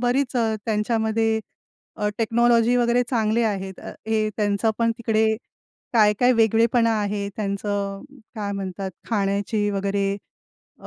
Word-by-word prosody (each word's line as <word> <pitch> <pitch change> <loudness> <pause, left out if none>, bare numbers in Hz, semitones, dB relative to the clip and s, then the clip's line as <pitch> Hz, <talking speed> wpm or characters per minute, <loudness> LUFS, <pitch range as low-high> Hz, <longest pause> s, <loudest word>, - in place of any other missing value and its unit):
बरीच 250 +1 +1
अ, 225 -2 +1
त्यांच्यामध्ये 220 0 +1 0.6
अ, 210 - 0
टेक्नॉलॉजी 235 +1 +3
वगैरे 240 0 +3
चांगले 225 -1 +1
आहेत. 195 -3 -3
अ, - - -8 0.2
हे 215 -1 +1
त्यांचं 205 +1 +1
पण 230 0 +2
तिकडे 220 -1 +2 0.7
काय-काय 220 +2 +4
वेगळेपणा 230 +1 +3
आहे. 205 0 -2
त्यांचं 200 -1 -2 0.3
काय 205 -3 -3
म्हणतात 195 -1 -4 0.2
खाण्याची 205 0 0
वगैरे 200 0 -1 0.7
अ, - - -11
220 Hz, 120 wpm, -23 LUFS, 200-230 Hz, 0.7 s, काय-काय